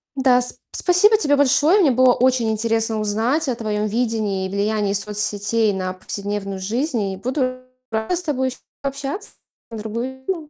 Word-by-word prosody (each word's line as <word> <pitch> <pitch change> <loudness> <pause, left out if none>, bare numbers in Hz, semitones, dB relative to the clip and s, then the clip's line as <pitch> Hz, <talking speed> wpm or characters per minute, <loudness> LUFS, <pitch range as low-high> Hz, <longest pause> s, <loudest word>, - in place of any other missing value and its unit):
да, 255 -2 +4
сп 245 - -3
спасибо 415 +4 +4
тебе 290 -8 +2
большое. 290 +7 +4
Мне 300 - +5
было 255 0 +5
очень 250 -2 +2
интересно 225 0 0
узнать 225 +9 0
о 245 - 0
твоем 215 -2 -2
видении, 215 -4 -1
и - - -4
влиянии 205 0 0
соцсетей 210 +1 0
на 185 -1 -3
повседневную 200 +1 -4
жизнь. 235 +5 -1
И - - -7
буду 255 +2 -2 0.3
рада 220 +10 -1
с 350 - -1
тобой 260 -5 -1
еще 255 - -9 0.2
пообщаться 275 +8 -4 0.4
в 225 - -5
другой 265 - -4
230 Hz, 160 wpm, -21 LUFS, 210-270 Hz, 0.4 s, Мне